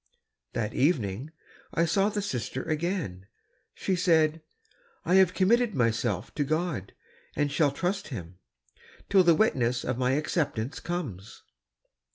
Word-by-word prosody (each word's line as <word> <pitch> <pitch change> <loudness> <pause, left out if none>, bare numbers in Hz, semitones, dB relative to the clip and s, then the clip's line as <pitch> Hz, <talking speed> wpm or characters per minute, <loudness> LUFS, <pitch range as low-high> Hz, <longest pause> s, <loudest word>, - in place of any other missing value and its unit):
That 110 -1 -2
evening 130 - 0 0.5
I 165 - +3
saw 195 +5 +2
the 205 -1 -3
sister 130 - -3
again. 155 - -3 0.5
She 190 - -1
said, 160 -3 +3 0.3
" 475 -2 -35
I - - +1
have 185 -1 +2
committed 225 +3 +3
myself 115 -5 0
to 150 - 0
God, 155 - -2 0.4
and 145 -1 0
shall 145 0 +3
trust 180 +7 -2
Him, 90 - -8 0.7
till 195 -2 +6
the 170 -2 +5
witness 125 - +1
of 130 -1 -2
my 130 0 +2
acceptance 145 -4 -1
comes." 120 - -5
150 Hz, 135 wpm, -28 LUFS, 120-180 Hz, 0.7 s, till